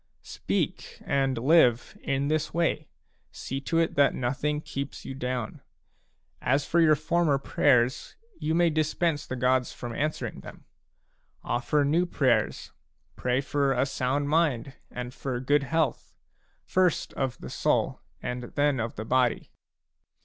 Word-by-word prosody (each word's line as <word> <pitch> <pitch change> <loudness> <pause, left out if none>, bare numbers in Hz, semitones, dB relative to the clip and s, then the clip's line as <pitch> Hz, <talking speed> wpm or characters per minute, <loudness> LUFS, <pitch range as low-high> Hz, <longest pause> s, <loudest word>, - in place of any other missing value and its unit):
Speak, - - -3
and 135 -2 +1
live, 125 -2 +3
in 140 +1 -1
this 155 +1 -1
way; 165 -3 0 0.4
see 135 +1 -5
to 165 +4 -1
it 165 -1 +2
that 140 0 +3
nothing 145 +4 -1
keeps 140 -2 -6
you - - -5
down. 125 -3 -4 0.8
As 140 +3 +1
for 170 - +2
your 155 -2 +6
former 155 0 +1
prayers, 125 -2 +1 0.2
you 160 +1 0
may 170 -1 +4
dispense 155 0 0
the 130 - -4
gods 125 0 +1
from 120 -1 -7
answering 155 +5 -2
them; - - -12 0.8
ofFer 145 +4 +1
new 165 +5 +2
prayers; 125 -9 +1 0.4
pray 125 +1 0
for 140 0 +1
a 125 +1 +2
sound 135 +1 -1
mind 145 -5 +1 0.2
and 125 0 -6
for 130 -3 -4
good 145 +3 +2
health, 155 -1 -1 0.5
first 185 -3 +1
of 135 -2 -2 0.2
soul - - 0 0.2
and 125 0 -3
then 145 +2 0
of 115 0 -3
body. 125 -1 +1
140 Hz, 135 wpm, -27 LUFS, 125-155 Hz, 0.8 s, your